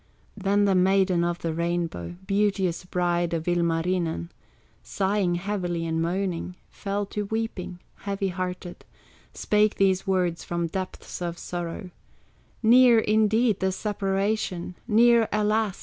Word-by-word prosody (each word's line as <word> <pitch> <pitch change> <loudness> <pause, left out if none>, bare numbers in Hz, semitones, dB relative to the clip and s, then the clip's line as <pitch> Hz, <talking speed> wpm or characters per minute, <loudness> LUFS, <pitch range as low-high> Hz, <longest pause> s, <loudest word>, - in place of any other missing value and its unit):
Then 200 0 +2
the 195 - +3
Maiden 185 -1 +3
of 175 0 -1
the 165 -2 -3
Rainbow, 170 - -2
Beauteous 195 -3 0
bride 175 -1 0
of 160 -1 -3
Ilmarinen, 170 - 0 0.5
Sighing 195 -2 0
heavily 175 -3 -2
and 160 0 -1
moaning, 180 0 -2 0.2
Fell 200 +1 -3
to 205 +1 -4
weeping, 200 -4 -4 0.2
heavy 200 -1 -2
hearted, 180 -1 -5 0.5
Spake 210 0 +2
these 190 -1 +2
words 180 -3 0
from 170 0 -2
depths 185 +2 -6
of 170 -1 -3
sorrow: 175 +1 -5 0.7
"Near, 240 +1 +7
indeed, 220 0 +2
the 190 0 +1
separation, 195 -2 -2
Near, 230 0 +5
alas! 210 -1 +1
190 Hz, 120 wpm, -26 LUFS, 175-205 Hz, 0.7 s, Near